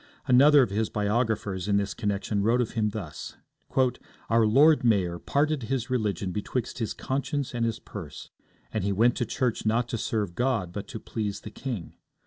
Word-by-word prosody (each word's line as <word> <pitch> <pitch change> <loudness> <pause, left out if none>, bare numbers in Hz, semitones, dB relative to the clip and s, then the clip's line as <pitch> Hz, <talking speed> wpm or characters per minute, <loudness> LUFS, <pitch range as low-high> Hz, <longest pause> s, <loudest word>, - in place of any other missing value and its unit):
Another 140 +2 +7
of 105 - -2
his 110 +2 0
biographers 105 -3 -1
in 100 -1 +3
this 100 0 -1
connection 100 0 -1
wrote 115 +4 +3
of 120 - 0
him 110 -2 0
thus: 100 -7 -7 0.9
'Our 115 -1 +5
Lord 145 +7 +5
Mayor 95 -7 +2
parted 150 - 0
his 125 +1 -2
religion 105 -6 -1
betwixt 115 +6 -3
his 110 - -2
conscience 140 +1 -2
and 120 -1 -1
his 115 -1 -1
purse, 85 -11 -9 0.4
and - - -1
he 100 - 0
went 115 +5 +3
to 120 - -1
church 120 0 -1
not 115 +2 +1
to 115 - -2
serve 105 -6 -1
God, 115 -6 0
but 100 - -5
to 115 - -6
please 105 -3 -4
the 105 - -9
king. 115 -11 -5
110 Hz, 180 wpm, -27 LUFS, 100-125 Hz, 0.9 s, Another